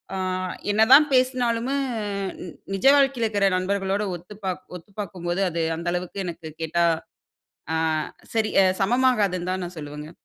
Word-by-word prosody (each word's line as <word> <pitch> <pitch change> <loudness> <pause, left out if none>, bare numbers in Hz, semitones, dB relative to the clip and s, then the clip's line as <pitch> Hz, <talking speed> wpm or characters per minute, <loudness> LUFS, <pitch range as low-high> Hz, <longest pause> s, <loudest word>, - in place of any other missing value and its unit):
அ - - -2 0.5
என்னதான் 225 +8 +7
பேசினாலுமே 255 -1 +1 1.0
நிஜ 195 +3 -3
வாழ்க்கையில 270 -5 +3
இருக்கிற 205 -2 +1
நண்பர்களோட 195 +2 0
ஒத்துப்பாக் 185 +1 -6
ஒத்துபார்க்கும்போது 180 -1 -5
அது 170 0 -2
அந்த 170 +2 -6
அளவுக்கு 180 +2 -4
எனக்கு 170 -2 -6
கேட்டா 165 +2 +1 0.9
அ - - +1 0.6
சரி 220 -1 +1
அ - - +4 0.2
சமமாகாதுன்னு 205 -5 +2
தான் 185 0 -2
நான் 175 +1 -7
சொல்லுவேங்க. 150 0 -8
195 Hz, 125 wpm, -24 LUFS, 175-230 Hz, 1.0 s, என்னதான்